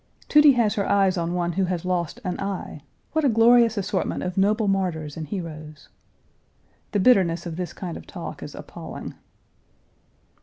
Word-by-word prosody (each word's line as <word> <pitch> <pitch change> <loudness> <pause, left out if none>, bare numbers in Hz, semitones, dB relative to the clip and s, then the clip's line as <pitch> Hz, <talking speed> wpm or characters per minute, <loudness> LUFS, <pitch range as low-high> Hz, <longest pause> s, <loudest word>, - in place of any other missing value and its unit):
"Tudy 300 -2 +6
has 225 -4 +2
her 200 -3 -1
eyes 195 -2 +3
on 170 0 -2
one 175 -1 0
who 190 +2 0
has 180 -1 -3
lost 180 +3 -2
an 180 -2 -3
eye. 195 -6 -5 0.3
What 315 0 0
a 280 - +4
glorious 230 0 +5
assortment 195 - -2
of 180 -1 -3
noble 210 +2 +2
martyrs 175 -6 -1
and 160 -1 -6
heroes!" 155 -4 -7 1.0
"The 205 - +1
bitterness 185 -6 +3
of 170 -2 -5
this 175 -1 -4
kind 175 -3 -6
of - - -10
talk - - -7
is - - -8
appalling." - - -8
185 Hz, 165 wpm, -24 LUFS, 170-210 Hz, 1.0 s, Tudy